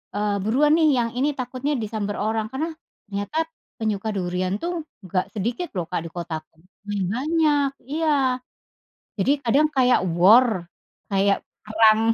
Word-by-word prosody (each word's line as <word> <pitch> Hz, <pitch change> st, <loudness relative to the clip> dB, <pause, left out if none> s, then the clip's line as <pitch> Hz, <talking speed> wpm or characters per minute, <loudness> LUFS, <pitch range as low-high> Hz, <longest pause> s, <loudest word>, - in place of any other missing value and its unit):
eee, 205 Hz, 0 st, 0 dB
buruan 285 Hz, +8 st, +3 dB
nih, 315 Hz, -2 st, +4 dB
yang 230 Hz, -1 st, +1 dB
ini 290 Hz, +3 st, +1 dB
takutnya 255 Hz, +3 st, -2 dB
disamber 210 Hz, -2 st, -3 dB
orang 220 Hz, 0 st, 0 dB
karena 320 Hz, +5 st, -2 dB, 0.4 s
ternyata 205 Hz, +9 st, -4 dB, 0.4 s
penyuka 220 Hz, -1 st, -1 dB
durian 185 Hz, +1 st, -1 dB
tuh 340 Hz, -2 st, -3 dB, 0.2 s
nggak 185 Hz, +1 st, -2 dB
sedikit 235 Hz, -, -2 dB
loh, 170 Hz, -, -1 dB
Kak, 180 Hz, -, -1 dB
di -, -, -6 dB
kotaku. 165 Hz, -2 st, -6 dB, 0.3 s
Ya, 205 Hz, -1 st, -1 dB
banyak. 295 Hz, +1 st, +2 dB, 0.2 s
Iya, 320 Hz, 0 st, +1 dB, 1.1 s
jadi 260 Hz, +9 st, +3 dB
kadang 285 Hz, +6 st, +4 dB
kayak 255 Hz, -2 st, +4 dB, 0.2 s
war 215 Hz, +1 st, +6 dB, 0.5 s
kayak 200 Hz, 0 st, +3 dB, 0.3 s
perang, 215 Hz, 0 st, +5 dB
220 Hz, 140 wpm, -23 LUFS, 200-285 Hz, 1.1 s, war